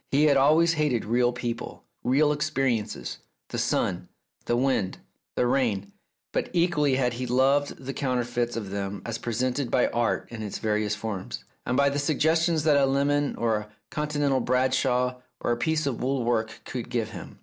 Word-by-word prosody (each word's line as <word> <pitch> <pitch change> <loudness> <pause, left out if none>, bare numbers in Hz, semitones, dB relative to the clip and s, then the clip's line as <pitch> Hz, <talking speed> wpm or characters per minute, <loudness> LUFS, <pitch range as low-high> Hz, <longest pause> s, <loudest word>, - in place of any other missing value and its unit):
He 140 +2 +3
had 150 -2 +5
always 155 +5 +5
hated 150 -7 0
real 120 +2 +2
people, 120 -1 -5 0.2
real 145 +4 +3
experiences, 125 - -1 0.3
the - - -3
sun, - - 0 0.4
the 120 - +1
wind, 125 -7 +1 0.4
the - - +2
rain, 110 -6 0 0.4
but - - -1
equally 170 -6 +2
had 125 -2 +1
he 125 +1 -4
loved 135 +3 +2
the 135 +1 -6
counterfeits 120 -3 -1
of 105 -4 -4
them 100 0 -4
as 115 -1 -3
presented 125 +3 -1
by 125 - +3
Art 120 -1 0
in 115 -2 -6
its 105 -2 -4
various 105 -1 0
forms, 105 -3 -5 0.2
and 125 - +1
by 140 0 +5
the 145 - -1
suggestions 160 +2 +2
that 150 -2 +4
a 140 -1 +4
lemon 145 +1 +1
or 115 -2 +1
a 105 0 -7 0.2
continental 145 -3 0
Bradshaw 125 0 +1 0.2
or - - -1
a - - +3
piece 155 +5 0
of 135 -5 -2
wool 130 0 0
work 110 -2 -1
could 125 -3 -5
give 115 -3 -1
him. 90 -6 -9
125 Hz, 175 wpm, -26 LUFS, 115-140 Hz, 0.4 s, had